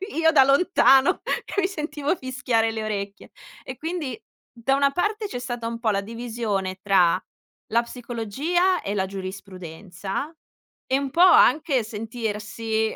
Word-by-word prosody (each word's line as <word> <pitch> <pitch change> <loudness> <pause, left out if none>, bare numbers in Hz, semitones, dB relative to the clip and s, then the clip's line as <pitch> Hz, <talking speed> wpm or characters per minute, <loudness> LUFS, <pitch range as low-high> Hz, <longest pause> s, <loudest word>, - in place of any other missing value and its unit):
io 320 0 +4
da 280 -4 +7
lontano, 275 -3 +4 0.4
mi 385 -2 +3
sentivo 305 -3 -2
fischiare 250 -5 0
le 220 -1 -4
orecchie. 200 -2 -5 0.3
E, 260 - -7
quindi 315 -7 -4 0.4
da 245 +3 0
una 280 0 +3
parte, 420 +5 -1
c'è 250 - -5
stata 240 -1 -4
un 230 0 -5
po' 230 -2 0
la 200 -2 +1
divisione 220 -4 -3
tra 185 -3 +3 0.5
la 230 +2 +4
psicologia 250 - -1
e 200 - -3
la 190 -2 0
giurisprudenza, 190 - -6 0.5
e 265 - +1
un 275 -1 -2
po' 310 - -5
anche 305 -7 +5
sentirsi 220 0 -3
235 Hz, 140 wpm, -24 LUFS, 205-280 Hz, 0.5 s, da